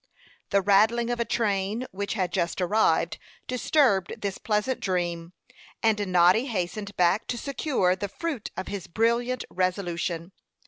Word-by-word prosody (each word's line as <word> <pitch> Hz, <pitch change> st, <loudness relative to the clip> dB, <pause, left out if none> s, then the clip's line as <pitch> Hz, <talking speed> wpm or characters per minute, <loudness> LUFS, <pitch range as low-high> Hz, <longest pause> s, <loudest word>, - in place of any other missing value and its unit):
The 200 Hz, -1 st, +2 dB
rattling 220 Hz, +5 st, +3 dB
of 240 Hz, -, -2 dB
a 235 Hz, -, +1 dB
train 210 Hz, +1 st, 0 dB
which 200 Hz, +2 st, -3 dB
had 185 Hz, -4 st, -1 dB
just 175 Hz, -1 st, -1 dB
arrived 205 Hz, +5 st, +2 dB, 0.3 s
disturbed 250 Hz, -, +2 dB
this 200 Hz, -2 st, -3 dB
pleasant 215 Hz, +4 st, 0 dB
dream, 175 Hz, -2 st, -2 dB, 0.5 s
and 210 Hz, -2 st, +2 dB
Noddy 180 Hz, +8 st, +5 dB
hastened 200 Hz, -1 st, -3 dB
back 180 Hz, +4 st, +2 dB
to 245 Hz, -, -2 dB
secure 255 Hz, -, 0 dB
the 200 Hz, +1 st, -4 dB
fruit 300 Hz, -, -4 dB
of 185 Hz, -, -4 dB
his 200 Hz, -3 st, -5 dB
brilliant 235 Hz, +5 st, 0 dB
resolution. 180 Hz, -2 st, -2 dB
200 Hz, 140 wpm, -26 LUFS, 180-235 Hz, 0.5 s, Noddy